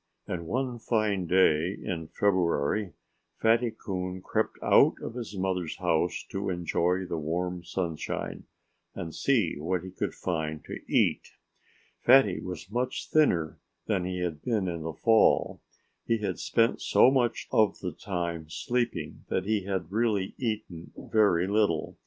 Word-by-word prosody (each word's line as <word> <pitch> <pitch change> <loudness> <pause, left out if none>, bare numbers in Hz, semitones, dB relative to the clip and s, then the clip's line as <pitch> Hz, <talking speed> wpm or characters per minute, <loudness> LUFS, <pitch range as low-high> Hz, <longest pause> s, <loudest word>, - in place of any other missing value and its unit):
And 85 -2 -5
one 125 +2 -2
fine 105 -6 0
day 90 0 +3
in 80 -3 -4
February 95 0 +1 0.5
Fatty 115 +2 +3
Coon 95 -4 -5
crept - - -1
out - - +5
of - - -6
his 115 -5 -6
mother's 95 -3 -2
house 80 +2 0
to 95 0 -2
enjoy 90 +1 0
the 85 -2 -3
warm 90 +3 -2
sunshine 85 -3 -4 0.5
and 80 -2 -5
see 115 - +1
what 90 +3 -1
he 95 - -8
could - - -3
find 80 -3 -3
to - - -6
eat. - - +2 0.7
Fatty 135 +2 +5
was 90 +1 -7
much 125 +3 -2
thinner 85 - +2 0.3
than 100 -5 0
he 90 0 -3
had 80 -4 -3
been 110 -6 0
in 85 -2 -3
the 80 +1 -4
fall. 110 +6 +3 0.5
He 115 - +2
had 105 -2 -3
spent 115 0 +1
so 130 - +5
much 120 -3 0
of 110 -2 +3
the 90 - -4
time 85 -4 -4
sleeping 120 +6 -2
that 95 - -1
he 105 -2 0
had 95 -3 -3
really 105 -3 0
eaten 105 -8 -4
very 100 -5 +2
little. 100 -5 +1
95 Hz, 145 wpm, -28 LUFS, 85-110 Hz, 0.7 s, out